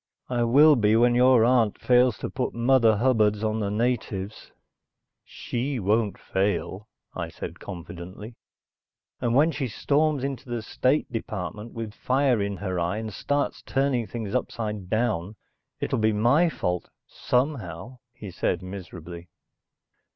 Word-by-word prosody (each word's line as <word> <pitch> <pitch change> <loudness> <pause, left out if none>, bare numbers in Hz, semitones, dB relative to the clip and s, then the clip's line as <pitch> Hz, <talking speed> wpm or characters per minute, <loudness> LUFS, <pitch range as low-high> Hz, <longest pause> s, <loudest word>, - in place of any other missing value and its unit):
"I 120 -1 0
will 145 +6 +6
be 110 -3 +3
when 120 +1 +4
your 125 -1 +5
aunt 120 -4 +2
fails 125 -3 +3
to - - -5
put - - -3
mother 115 -2 +4
hubbards 110 -3 +2
on 110 0 0
the 100 -2 -1
natives." 110 -3 -2 0.7
"She 130 +3 -4
won't 105 +1 +1
fail," 100 +1 -2 0.3
I - - -4
said - - -8
confidently. 90 +5 -9 0.9
"And 120 -1 0
when 155 +5 +5
she 140 -4 -3
storms 145 +4 +1
into 135 -1 -4
the 120 -2 -3
State 130 +5 0
Department 110 -1 -5
with 115 -2 -6
fire 130 -1 +1
in 100 -1 -2
her 95 -3 -3
eye 85 +4 -1
and 110 -1 -5
starts 145 +8 -1
turning 135 -4 0
things 115 -4 -5
upside 105 -6 -3
down, 110 -4 -1 0.4
it'll - - -1
be 110 0 +2
my 125 +11 +3
fault 90 - -3 0.2
somehow," 125 - -2
he 110 -5 -9
said 90 +1 -1
miserably. 90 -2 -9
115 Hz, 140 wpm, -25 LUFS, 100-125 Hz, 0.9 s, will